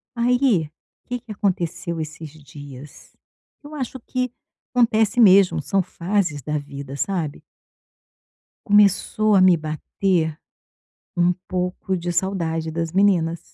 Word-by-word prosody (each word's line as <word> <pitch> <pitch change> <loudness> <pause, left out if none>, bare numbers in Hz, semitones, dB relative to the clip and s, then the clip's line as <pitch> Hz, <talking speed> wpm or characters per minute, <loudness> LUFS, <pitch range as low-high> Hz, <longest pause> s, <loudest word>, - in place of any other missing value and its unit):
Aí, 240 - +2 0.4
que 245 0 -3
que 225 -2 -12
aconteceu 175 -4 -2
esses 155 0 -6
dias? 145 -2 -13 0.5
Eu 290 +1 -11
acho 260 -3 -5
que 255 +1 -3 0.4
acontece 230 -2 +2
mesmo, 190 -6 +6
são 190 +7 +1
fases 175 -4 -2
da 150 +3 -2
vida, 140 -1 -7
sabe? 160 -2 -3 1.2
Começou 205 +1 +3
a 190 - +5
me 185 -2 +6
bater 160 +1 -1 0.8
um 175 +1 +3
pouco 180 +1 -2
de 175 0 -4
saudade 165 -3 -1
das 165 0 -3
meninas. 175 -4 +2
180 Hz, 115 wpm, -22 LUFS, 160-205 Hz, 1.2 s, mesmo